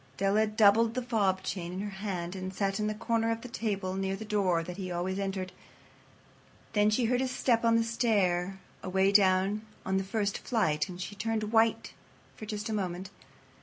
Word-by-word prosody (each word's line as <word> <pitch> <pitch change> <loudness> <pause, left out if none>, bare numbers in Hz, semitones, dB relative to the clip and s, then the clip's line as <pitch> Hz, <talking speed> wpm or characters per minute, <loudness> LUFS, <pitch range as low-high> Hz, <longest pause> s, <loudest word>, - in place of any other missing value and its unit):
Della 200 +3 +2
doubled 220 +2 +4
the 255 - -1
fob 200 -6 +1
chain 175 -3 -4
in 185 - -4
her 205 - -3
hand 180 -3 -3
and 185 0 -4
sat 195 +1 -1
on 210 - 0
the 215 - -2
corner 225 +1 0
of 230 0 -1
the 250 - -7
table 205 -5 -2
near 195 0 -1
the 220 - -7
door 190 -6 +1
that 175 +2 -7
he 185 -2 -4
always 180 +2 -2
entered. 190 -1 -3 1.2
Then 210 0 +4
she 230 +3 +2
heard 250 +2 +2
his 260 - 0
step 240 -2 +1
on 230 0 +4
the 230 - +3
stair 195 -6 +1 0.2
away 190 +1 +2
down 195 +1 +4 0.2
on 190 0 +1
the 190 - 0
first 200 +1 -1
flight, 155 - 0
and 180 -1 -8
she 185 - -5
turned 215 +1 -2
white 225 0 +2 0.4
for 215 - -9
just 210 -1 -4
a 220 - -2
moment. 190 -2 -3
200 Hz, 200 wpm, -30 LUFS, 190-220 Hz, 1.2 s, doubled